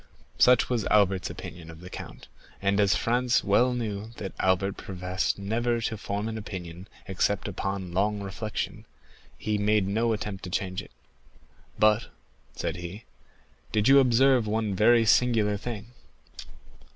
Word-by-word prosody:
Such 125 -1 +5
was 120 -4 0
Albert's 95 -3 +2
opinion 85 -2 -9
of 80 0 -11
the 90 +1 -10
count, - - -9 0.3
and 100 +1 +1
as 100 -1 +4
Franz 120 +1 +1
well 120 +6 +3
knew 110 -4 -3
that 95 - -6
Albert 95 +1 +1
professed 90 0 -3
never 115 +4 -1
to 110 - -2
form 105 0 -3
an 110 0 -4
opinion 90 -3 -8 0.2
except 95 +2 0
upon 95 -2 -4
long 105 +3 +1
reflection, 100 +2 -5 0.5
he 105 -1 -1
made 105 -1 +2
no 115 +4 +1
attempt 105 -3 -4
to - - -6
change 95 0 -2
it. - - -14 0.9
"But," 105 +1 +3 0.5
said - - -3
he, 90 +5 -7 0.7
"did 105 0 +2
you 135 +1 +8
observe 130 -2 +4
one 110 -1 -1
very 115 +4 +4
singular 110 -2 +3
thing?" 110 +1 -6
105 Hz, 145 wpm, -27 LUFS, 95-115 Hz, 0.9 s, you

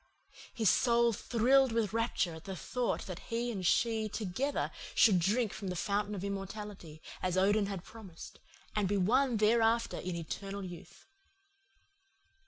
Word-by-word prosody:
His 220 -2 0
soul 235 -1 +3
thrilled 255 +4 +3
with 225 -3 0
rapture 230 -6 0
at 160 0 -11
the 195 - -5
thought 245 +6 -2
that 185 -2 -6
he 235 +1 -1
and 195 -5 -4
she 220 +3 +2
together 225 +8 -2 0.2
should 205 -7 +6
drink 210 +5 +1
from 200 - -6
the 180 - -3
fountain 205 +3 -1
of 190 - -5
immortality, 195 -5 -6 0.2
as 185 0 -1
Odin 200 +2 +3
had 195 -3 -5
promised, 195 -8 -11 0.4
and 210 -2 +1
be 205 +2 +1
one 240 +6 +2
thereafter 225 +2 +2
in 180 -1 -4
eternal 195 +4 -5
youth. 175 -2 -11
210 Hz, 150 wpm, -32 LUFS, 185-230 Hz, 0.4 s, should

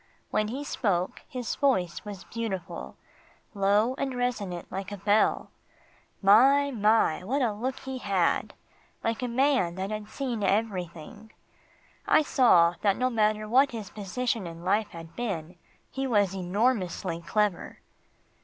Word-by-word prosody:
When 215 - +1
he 265 +6 -4
spoke, 190 -10 -1
his 250 -5 -4
voice 185 -12 0
was 205 -3 -8
beautiful 195 -6 -5 0.6
low 205 +4 +2
and 270 -2 -2
resonant 205 -8 -3
like 195 +1 -5
a 205 - -5
bell. 205 +2 +2 0.7
My! 270 +8 +6
my! 210 -7 +2
what 265 +8 0
a 225 -4 +1
look 250 +5 -3
he 265 -1 -5
had 195 -6 0 0.5
like 225 +1 -1
a 250 - -1
man 250 -8 +2
that 190 +2 -4
had 215 0 -5
seen 250 -6 -3
everything. 200 +1 -2 0.8
I 310 - +5
saw 175 - +5
that 200 -2 +2
no 255 0 +1
matter 215 -1 +1
what 265 +4 +4
his 215 -4 -6
position 215 0 -2
in 165 +1 -9
life 205 +3 +2
had 165 -1 -11
been, 180 -8 -4 0.4
he 270 0 -2
was 205 -6 +2
enormously 185 -2 -1
clever. 205 +1 -1
210 Hz, 140 wpm, -27 LUFS, 185-245 Hz, 0.8 s, My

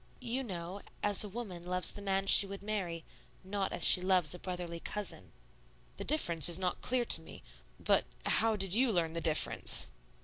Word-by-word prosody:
"You 250 +1 -3
know, 185 -2 -7 0.2
as 205 0 +6
a 210 - -6
woman 195 -5 -7
loves 180 0 0
the 205 - -10
man 195 -1 -1
she 195 0 +5
would 200 0 -9
marry, 185 -6 -4 0.4
not 195 0 -3
as - - -2
she 180 - +8
loves 180 -4 +2
a 180 - -8
brotherly 175 -2 -6
cousin." 210 +4 -5 0.7
"The - - -4
difference 170 - +2
is 170 - -2
not 185 -1 -2
clear 250 -1 -1
to - - +1
me - - -13 0.4
but - - +2 0.2
how 225 -1 +2
did 195 -3 -3
you 245 +2 +3
learn 165 -4 0
the 165 - -3
difference?" 155 - +2
190 Hz, 190 wpm, -32 LUFS, 175-210 Hz, 0.7 s, she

